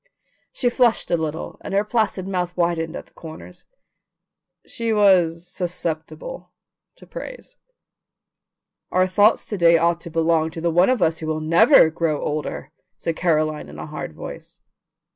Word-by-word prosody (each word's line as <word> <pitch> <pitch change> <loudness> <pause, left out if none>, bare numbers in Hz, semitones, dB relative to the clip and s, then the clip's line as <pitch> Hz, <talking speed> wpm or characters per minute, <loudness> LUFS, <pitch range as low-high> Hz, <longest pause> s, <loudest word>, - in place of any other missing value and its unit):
She 245 -2 0
flushed 240 -2 +2
a - - +4
little, 160 -1 -4
and 195 - -4
her 200 - +3
placid 210 -4 -1
mouth 180 -2 -3
widened 170 -2 0
at - - -7
the - - -29
corners. 165 +2 -12 1.0
She 230 -1 -3
was 180 -5 +3
susceptible 175 - -5 0.5
to - - -16
praise. - - -9 1.4
"Our 185 0 +3
thoughts 205 +4 +3
to 205 - -5
day 170 -1 +6
ought 170 +1 +1
to 170 - -8
belong 165 -1 +1
to 165 - -8
the 170 0 +1
one 175 +5 +4
of 255 -7 +2
us 160 0 +1
who 160 - -5
will 155 0 -1
NEVER 165 - +5
grow 160 -2 -1
older," 150 0 -4 0.3
said 165 - -3
Caroline 155 -3 0
in - - -11
a - - -6
hard 150 - -7
voice. - - -10
170 Hz, 160 wpm, -22 LUFS, 160-200 Hz, 1.4 s, day